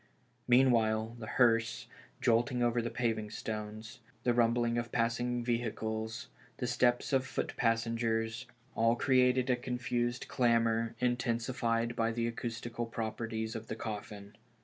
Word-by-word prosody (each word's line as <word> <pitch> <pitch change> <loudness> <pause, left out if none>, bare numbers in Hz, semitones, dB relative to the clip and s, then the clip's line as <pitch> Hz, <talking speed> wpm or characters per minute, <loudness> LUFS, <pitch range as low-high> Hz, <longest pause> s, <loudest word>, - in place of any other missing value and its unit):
Meanwhile, 115 -3 +3
the 110 - -7
hearse, 115 0 +2 0.4
jolting 120 +1 +2
over 120 0 +2
the 115 - -2
paving 110 -3 -1
stones, 110 +1 -6 0.2
the 120 - +3
rumbling 120 0 +2
of 120 0 -5
passing 120 +1 0
vehicles, 115 -1 -2 0.3
the 125 - -2
steps 120 +2 +1
of 130 0 +1
the - - +2
loot - - -8
passengers, 115 0 0 0.3
all 115 +1 +3
cre 130 +2 0
ated 125 0 +4
a - - +4
confused 125 0 -2
clamor, 115 -1 +2
intensified 120 -1 0
by 115 -1 +1
the 115 0 -1
acoustical 115 0 -4
properties 110 0 -3
of 110 0 -6
the - - -4
coffin. 105 -2 -6
115 Hz, 135 wpm, -32 LUFS, 115-120 Hz, 0.4 s, ated